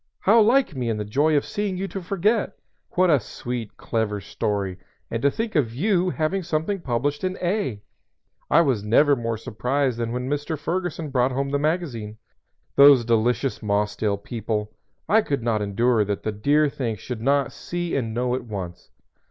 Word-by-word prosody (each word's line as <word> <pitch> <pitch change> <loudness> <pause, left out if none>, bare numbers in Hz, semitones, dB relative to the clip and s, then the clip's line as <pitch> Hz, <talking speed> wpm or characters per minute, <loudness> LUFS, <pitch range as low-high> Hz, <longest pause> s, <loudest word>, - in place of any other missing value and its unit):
"How 220 +4 +5
like 235 - +3
me 125 -3 -2
in 110 - -1
the 105 - -3
joy 145 +8 +2
of 145 - 0
seeing 205 -3 -2
you, 195 +1 -2
to 195 - -5
forget! 200 +4 0 0.4
What 185 -1 +4
a 145 - +5
sweet, 120 -2 -6
clever 110 -2 -2
story! 100 -1 -3 0.3
And 115 - -2
to 140 - +4
think 225 +9 -3
of 125 - +1
you 185 - +2
having 170 +3 -1
something 165 +4 -1
published 145 +1 -1
in 185 0 -1
'A 175 - -2 0.3
'! - - -44
I 170 - +6
never 130 +2 +3
was 125 - -1
more 115 -1 -1
surprised 125 +3 -1
than 115 -1 -2
when 125 +1 -3
Mr. 145 +3 -2
Ferguson 165 -1 -3
brought 130 -1 +2
home 140 +1 -1
the 140 - +1
magazine. 140 -10 -2 0.6
Those 140 -4 +7
delicious 120 +2 +1
Mossdale 105 0 0
people! 105 0 -3 0.4
I 220 +2 +5
could 140 - -2
not 115 -3 +1
endure 110 +3 +2
that 100 0 -3
the 110 - -1
dear 145 +9 +2
things 120 -7 -3
should 125 -3 -6
not 140 +3 +2
see 175 -1 -4
and 120 -5 -1
know 125 +2 -1
at 130 0 -2
once. 90 -5 -7
130 Hz, 185 wpm, -24 LUFS, 110-165 Hz, 0.6 s, Those